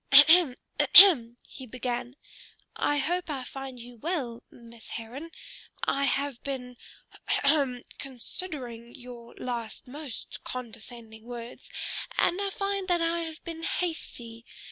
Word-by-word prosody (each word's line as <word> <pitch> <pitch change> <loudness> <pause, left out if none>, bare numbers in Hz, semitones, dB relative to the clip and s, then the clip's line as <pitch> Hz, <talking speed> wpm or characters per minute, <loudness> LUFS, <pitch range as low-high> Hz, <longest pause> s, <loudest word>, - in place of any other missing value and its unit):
"Ahem, 290 0 +8 0.2
ahem!" 245 -12 +9
he 260 - -11
began. 245 +1 -4 0.6
"I 290 - 0
hope 350 +5 -1
I 275 -4 -4
find 265 -1 -8
you 240 0 -12
well, 260 -5 -4
Miss 235 -1 -13
Heron? 250 +8 -7 0.5
I 280 0 +1
have 275 -1 -1
been 250 -3 -6 0.5
ha - - +1
hum! 280 -4 +1 0.2
considering 250 -3 -6
your 240 -1 -12
last 235 -3 -6
most 280 -1 -9
condescending 230 -2 -9
words, 240 0 -9 0.5
and 365 +4 +2
I 400 - -1
find 395 -1 -2
that 350 -2 +1
I 335 +1 0
have 325 -1 -6
been 330 -1 -7
hasty. 240 -10 -4
260 Hz, 125 wpm, -27 LUFS, 240-320 Hz, 0.6 s, ahem